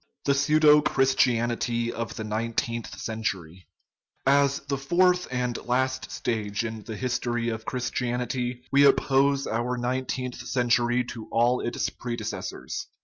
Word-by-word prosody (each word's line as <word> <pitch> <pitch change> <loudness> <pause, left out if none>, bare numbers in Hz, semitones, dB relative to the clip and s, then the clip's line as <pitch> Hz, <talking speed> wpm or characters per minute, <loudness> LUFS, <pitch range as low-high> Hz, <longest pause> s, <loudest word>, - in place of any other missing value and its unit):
THE 140 - +4
PSEUDO 150 +2 +5
CHRISTIANITY 120 -4 +1
OF 115 0 -4
THE 110 - -4
NINE 110 +2 -2
TEENTH 115 0 -3
CENTURY 95 -6 -4 0.6
As 140 0 +3
the 140 -1 -3
fourth 180 +5 +3
and 125 -1 -1
last 130 +1 0
stage 110 -1 -2
in 110 -1 -5
the 110 - -6
history 120 -1 -1
of 110 -1 -5
Chris 125 +1 -3
tianity 125 0 -2
we 140 +1 +5
oppose 140 0 +3
our 120 +2 -1
nineteenth 125 0 -2
century 120 0 +1
to 115 -2 -8
all 120 +2 +3
its 120 - -1
prede 120 -1 -5
cessors. - - -5
125 Hz, 140 wpm, -26 LUFS, 115-135 Hz, 0.6 s, PSEUDO